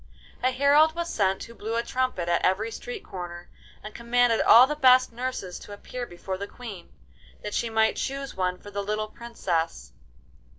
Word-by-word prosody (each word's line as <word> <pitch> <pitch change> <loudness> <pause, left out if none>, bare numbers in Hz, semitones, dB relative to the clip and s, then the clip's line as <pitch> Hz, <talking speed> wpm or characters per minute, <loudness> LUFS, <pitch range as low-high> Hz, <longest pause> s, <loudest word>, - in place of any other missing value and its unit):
A 255 - +3
herald 285 +4 +4
was 340 0 -3
sent 190 -2 +1
who 230 - -11
blew 225 0 -4
a 235 - 0
trumpet 255 -11 -1
at 170 0 +1
every 210 +5 +1
street 480 - -7
corner, 175 -1 -8 0.3
and 215 - -8
commanded 235 -1 +2
all 240 +3 +8
the 300 +3 -3
best 255 -3 +5
nurses 235 -7 -4
to 205 - -10
appear 245 +4 -7
before 185 +2 -6
the 200 - -4
Queen, 215 -8 -10 0.5
that 210 - -5
she 235 - -1
might 220 0 +2
choose 275 0 -3
one 180 -1 -1
for 205 - -12
the 200 0 -3
little 215 +1 -2
Princess. 185 -9 -3
225 Hz, 180 wpm, -26 LUFS, 190-255 Hz, 0.5 s, all